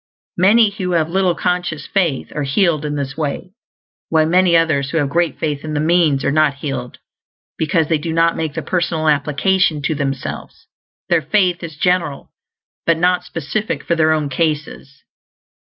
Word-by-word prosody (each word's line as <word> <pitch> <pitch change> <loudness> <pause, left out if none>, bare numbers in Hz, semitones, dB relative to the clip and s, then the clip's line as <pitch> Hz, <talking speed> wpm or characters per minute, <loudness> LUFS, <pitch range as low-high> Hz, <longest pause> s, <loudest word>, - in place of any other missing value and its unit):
Many 205 +3 +5
who 185 -3 -3
have 165 -1 +1
little 185 -1 +1
conscious 180 -4 -2
faith 170 -9 -1
are 150 - -2
healed 155 +2 +1
in 150 0 -2
this 135 -1 -4
way; 155 +4 -4 0.6
while 160 -1 +3
many 175 +1 +4
others 150 -5 +1
who 165 - -2
have 145 -3 0
great 170 0 0
faith 145 -2 -3
in 155 -1 -4
the - - 0
means 155 -3 +2
are - - +2
not 155 -1 +2
healed 135 -3 -5 0.6
because 160 0 0
they 160 -1 +1
do 165 +2 -4
not 165 +1 +2
make 160 -2 -3
the - - -3
personal 170 -3 -1
application 150 +3 +2
to 160 - 0
themselves; 140 -2 -5 0.4
their 170 -2 +3
faith 180 +3 +1
is 160 -3 -8
general, 170 -5 -1 0.6
but 165 -1 +3
not 180 +1 +2
specific 180 +5 -4
for 170 - 0
their 160 -1 +3
own 155 -2 0
cases. 150 -2 -3
160 Hz, 170 wpm, -18 LUFS, 145-175 Hz, 0.6 s, Many